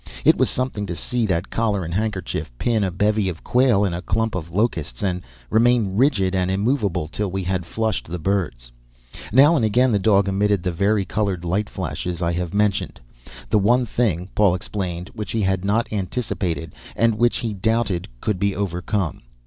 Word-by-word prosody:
It - - +7
was - - +2
something 125 -5 -2
to 85 - -3
see 120 +7 0
that 90 -1 -1
collar 105 -5 0
and 85 - -5
handkerchief 100 - -2
pin 115 - +1
a 95 - +1
bevy 105 +2 +1
of 85 -2 -7
quail 120 -5 +3
in 95 - -1
a 85 - -3
clump 110 +3 -1
of 85 -3 -4
locusts 85 - -1
and 90 -2 -1 0.3
remain 115 -3 +3
rigid 105 -7 +2
and 90 -1 +1
immovable 100 - 0
till 100 +4 -3
we 95 +1 -3
had 90 -1 -2
flushed 110 +3 -2
the 85 +2 -4
birds. 80 -10 -2 0.6
Now 140 +8 +6
and 135 - +2
again 120 +4 +3
the 105 - +2
dog 100 0 +3
emitted 100 -1 +1
the 90 - 0
vari 100 +3 +1
colored 95 -3 -2
light 100 +5 0
flashes 90 -2 -4
I 85 -1 0
have 90 -1 -2
mentioned. 100 -6 0 0.5
The 105 - +5
one 120 +5 +3
thing, 95 -6 -1
Paul 100 -4 +4
explained, 90 -1 -4
which 105 -2 -5
he 110 -2 0
had 95 -1 0
not 110 +3 0
anticipated 95 -5 -3 0.2
and 115 -2 +2
which 120 0 +3
he 115 -3 -3
doubted 105 -3 0
could 105 -4 -1
be 100 0 +1
overcome. 90 -1 -2
100 Hz, 190 wpm, -22 LUFS, 90-110 Hz, 0.6 s, It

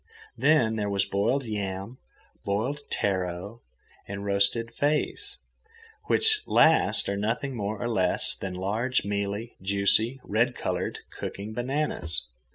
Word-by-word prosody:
Then 120 -8 +3
there 105 -1 -1
was 100 -1 +1
boiled 105 +8 0
yam, 100 +2 -4 0.4
boiled 110 +9 -1
taro, 95 +3 -2 0.5
and 100 0 -5
roasted 100 +4 +2
feis, 150 +1 0 0.7
which 440 -1 +5
last - - +4
are 100 - -1
nothing 115 +6 -2
more 105 -1 -3
or 120 - -2
less 95 -6 +2
than 95 -1 -5
large 110 +8 0
mealy, 100 +3 -3
juicy, 100 +6 +2
red 115 +4 +1
coloured - - -2 0.2
cooking 105 +2 -5
bananas. 120 - -1
105 Hz, 120 wpm, -27 LUFS, 100-120 Hz, 0.7 s, which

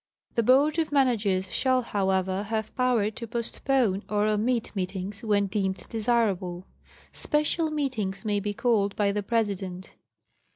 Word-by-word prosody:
The 235 - +2
Board 280 +7 +4
of 315 -2 0
Managers 210 -9 +1
shall, 255 -1 +2
however, 190 -2 0
have 220 +1 -3
power 245 -5 +2
to 230 +2 -7
postpone 235 -2 0
or 210 0 +1
omit 220 +2 0
meetings, 190 +2 -4
when 205 -2 +2
deemed 190 -1 -2
desirable. 205 -6 0 0.5
Special 300 +2 0
meetings 230 -11 -2
may 205 -1 +1
be 205 +1 -3
called 205 -5 +1
by 205 -1 +2
the 205 +1 -1
President. 195 -4 -2
210 Hz, 135 wpm, -27 LUFS, 195-245 Hz, 0.5 s, Board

